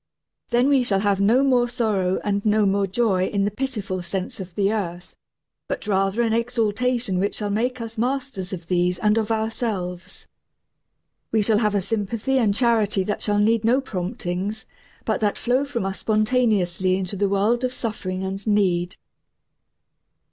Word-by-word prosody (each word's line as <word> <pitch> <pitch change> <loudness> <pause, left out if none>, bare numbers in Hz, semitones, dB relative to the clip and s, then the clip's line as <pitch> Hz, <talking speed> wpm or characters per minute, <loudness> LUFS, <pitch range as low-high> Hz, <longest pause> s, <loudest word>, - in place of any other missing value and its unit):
Then 245 +2 +3
we 280 -2 +4
shall 200 -6 0
have 200 -1 +1
no 230 +7 +4
more 250 -3 +3
sorrow 205 -6 0
and 200 -1 0
no 215 -1 +3
more 200 0 +2
joy 190 -2 +1
in 200 -1 0
the 205 - 0
pitiful 210 -6 -3
sense 190 +6 -4
of 180 -2 -8
the 200 +1 +2
earth, 180 -4 -4 0.5
but - - -4
rather 195 +2 +1
an 225 -1 +1
exaltation 230 -2 0
which 200 +2 0
shall 205 -1 -3
make 250 +5 -1
us 225 -1 -6
masters 250 -6 -2
of 175 -3 -6
these 180 0 +1
and 210 +2 +2
of 220 0 -2
ourselves. 200 -5 -3 1.1
We 220 -1 +2
shall 210 0 +2
have 210 -2 +1
a 200 - +2
sympathy 225 +6 -1
and 220 -5 +3
charity 220 -5 +2
that 205 +2 -3
shall 205 -1 +1
need 220 +2 +3
no 240 +4 +4
promptings, 185 -1 -4 0.4
but - - 0
that 210 -1 +1
flow 255 +3 +1
from 240 -8 -3
us 195 0 -3
spontaneously 215 -5 +1
into 190 +1 -4
the 200 0 +1
world 210 +5 +1
of 255 - 0
suffering 195 -6 -4
and 195 +2 -5
need. 185 -4 +1
210 Hz, 170 wpm, -23 LUFS, 190-230 Hz, 1.1 s, we